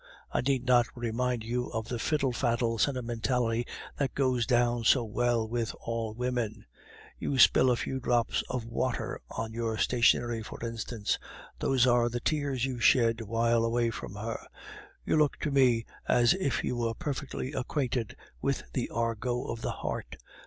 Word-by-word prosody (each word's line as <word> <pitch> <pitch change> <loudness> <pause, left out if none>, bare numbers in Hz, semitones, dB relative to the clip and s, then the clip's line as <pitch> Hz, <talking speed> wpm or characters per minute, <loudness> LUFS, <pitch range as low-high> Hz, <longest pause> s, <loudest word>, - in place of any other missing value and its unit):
I - - +1
need 130 -1 0
not 120 -2 +5
remind 120 0 -1
you 120 +2 -2
of 110 0 -4
the 120 - -3
fiddle 145 0 +1
faddle 115 -2 0
sentimentality 120 -2 0 0.3
that 135 -3 -1
goes 130 -4 +1
down 120 -1 +2
so 120 +2 +5
well 115 0 0
with 115 0 -2
all 115 -2 -3
women; 120 -3 -2 0.5
you 140 - -1
spill 130 +1 +6
a 125 - +4
few 130 +3 -3
drops 120 -2 +1
of 125 -3 -3
water 115 +1 -2
on 110 0 -4
your 115 -1 -2
stationery, 120 -1 +3
for 110 - -8
instance; 115 -2 -2 0.4
those 130 -2 +3
are 120 -1 +4
the 120 +1 -3
tears 140 -2 0
you 130 -2 -3
shed 115 0 +4
while 115 +2 +1
far 115 - +2
away 115 0 +1
from 100 - -7
her. 110 +2 -4 0.7
You - - +2
look 150 -2 +3
to 150 - -1
me 125 -4 +4 0.2
as 120 -1 +5
if 185 -8 -1
you 125 - -1
were 115 -1 -1
perfectly 140 -3 -4
acquainted 130 -4 -2 0.3
with - - 0
the - - -1
argot 115 +2 -1
of 115 - -5
the - - -2
heart. - - -4
120 Hz, 165 wpm, -29 LUFS, 115-125 Hz, 0.7 s, spill